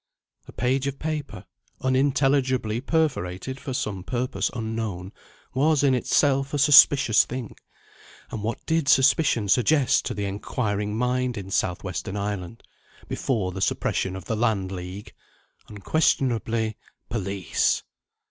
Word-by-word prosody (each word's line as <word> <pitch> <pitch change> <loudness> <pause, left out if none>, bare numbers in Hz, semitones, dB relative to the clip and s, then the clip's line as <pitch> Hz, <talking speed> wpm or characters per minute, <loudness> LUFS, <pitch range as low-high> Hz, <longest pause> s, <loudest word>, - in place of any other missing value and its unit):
A - - -10
page 130 +2 0
of 140 0 -3
paper, 150 - -5 0.4
unintelligibly 130 -3 +1
perforated 130 - -1
for 135 - -6
some 100 -7 -3
purpose 125 +4 -2
unknown, 110 -5 -4 0.4
was 145 +2 +2
in 135 -2 +4
itself 135 +2 +1
a - - +1
suspicious 135 -4 +6
thing. 125 -2 -6 0.8
And 110 - -5
what 115 +3 -4
did 160 -3 0
suspicion 130 -5 +4
suggest 130 +6 +3
to - - -4
the 100 - -3
inquiring 105 +1 -2
mind 125 0 0
in 95 -1 -7
South 90 -2 -1
Western 95 0 -4
Ireland, 100 +1 -4 0.4
before 105 -8 -1
the 95 +1 -6
suppression 95 0 -1
of 95 -2 -8
the 110 - -2
Land 105 -4 0
League? 95 +2 -7 0.6
Unquestionably 115 - 0 0.3
Police! 100 -4 -1
115 Hz, 125 wpm, -25 LUFS, 100-135 Hz, 0.8 s, suspicious